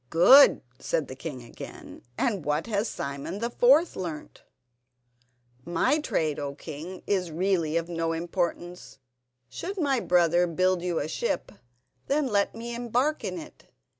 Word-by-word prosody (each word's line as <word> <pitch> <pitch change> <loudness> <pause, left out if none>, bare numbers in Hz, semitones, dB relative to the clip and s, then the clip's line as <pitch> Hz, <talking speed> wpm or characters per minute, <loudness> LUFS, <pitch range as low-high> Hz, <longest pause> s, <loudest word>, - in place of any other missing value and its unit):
"Good," 260 - +7 0.2
said 155 -4 -1
the 130 - -8
king 130 -3 -7
again; 115 - -11 0.2
"and 200 -8 0
what 150 +2 -1
has 215 -1 -1
Simon 140 +4 -5
the 235 +3 -3
fourth 280 +9 +4
learnt?" 165 -5 -6 1.2
"My 215 - +1
trade, 155 - -1
O 140 -1 -4
king, 165 +6 -8
is 185 -4 0
really 170 -1 0
of 165 0 -2
no 165 -1 -2
importance. 175 +1 -3 0.5
Should 365 - -6
my 280 -7 +1
brother 175 -2 +3
build 185 +2 +1
you 175 -2 -2
a 145 - -1
ship, 475 - -2 0.6
then 290 +1 +1
let 205 -5 0
me 235 +1 -6
embark 245 +5 0
in - - -3
it. - - -11
180 Hz, 145 wpm, -27 LUFS, 165-235 Hz, 1.2 s, Good